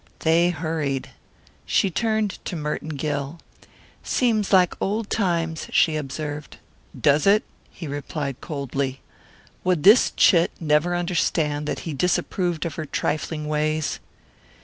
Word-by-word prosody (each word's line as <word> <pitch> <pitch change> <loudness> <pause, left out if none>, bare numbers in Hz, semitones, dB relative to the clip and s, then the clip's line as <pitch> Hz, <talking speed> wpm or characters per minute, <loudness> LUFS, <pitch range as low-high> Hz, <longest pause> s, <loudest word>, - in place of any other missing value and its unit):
They 165 +2 +4
hurried. 155 -5 -2 0.6
She 195 - +2
turned 220 0 -1
to 180 - -4
Merton 150 0 -3
Gill. 145 +2 -3 0.6
"Seems 220 -5 +1
like 185 -3 +5
old 210 +2 -1
times," 170 -6 0
she 160 - +3
observed. 150 0 -5 0.4
"Does 145 +3 +3
it?" 210 +2 +5 0.3
he 170 - -9
replied 140 -1 -4
coldly. 140 -2 -3 0.6
Would 180 -4 +1
this 210 +7 +7
chit 170 -3 +5
never 155 +2 +2
understand 160 -4 0
that - - -3
he 160 - -5
disapproved 175 +2 0
of 170 - -3
her - - -4
trifling 150 +1 -2
ways? 155 0 -1
160 Hz, 125 wpm, -23 LUFS, 150-180 Hz, 0.6 s, this